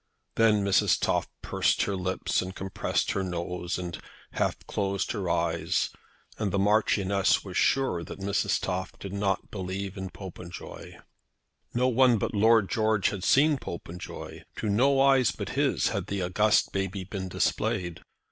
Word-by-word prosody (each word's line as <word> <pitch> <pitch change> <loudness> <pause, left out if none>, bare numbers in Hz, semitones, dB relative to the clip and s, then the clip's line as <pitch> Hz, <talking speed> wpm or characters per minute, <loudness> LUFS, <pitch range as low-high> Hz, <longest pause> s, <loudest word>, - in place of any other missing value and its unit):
Then 110 -2 +4
Mrs. 100 - +3
Toff - - +1 0.2
pursed - - +1
up - - +2
her 100 - -1
lips, 95 0 -1
and 95 0 -6
compressed 95 0 -1
her 100 - -1
nose, 90 0 -3
and 90 -2 -5 0.3
half - - -1
closed 100 -1 -1
her 100 -6 -2
eyes, 85 -1 0 0.5
and 105 -3 0
the 100 - 0
Marchioness 100 -1 +2
was 95 -2 -7
sure 130 -10 +2
that - - -8
Mrs. 100 0 0
Toff 95 +1 -3
did 100 -1 -7
not 100 -1 -1
believe 95 0 -4
in 95 0 -4
Popenjoy. 90 -2 -9 0.8
No 125 +1 +3
one 125 -1 +4
but - - -2
Lord 110 0 +4
George 110 -3 +2
had 100 -3 -5
seen 145 +5 +4
Popenjoy. 85 -2 -7
To 105 - -2
no 135 +7 +3
eyes 135 -2 +5
but - - -5
his - - +1
had - - -3
the 100 -2 -2
august 105 +5 +2
baby 95 0 -2
been 95 0 -5
displayed. 90 -1 -1
100 Hz, 155 wpm, -28 LUFS, 90-110 Hz, 0.8 s, eyes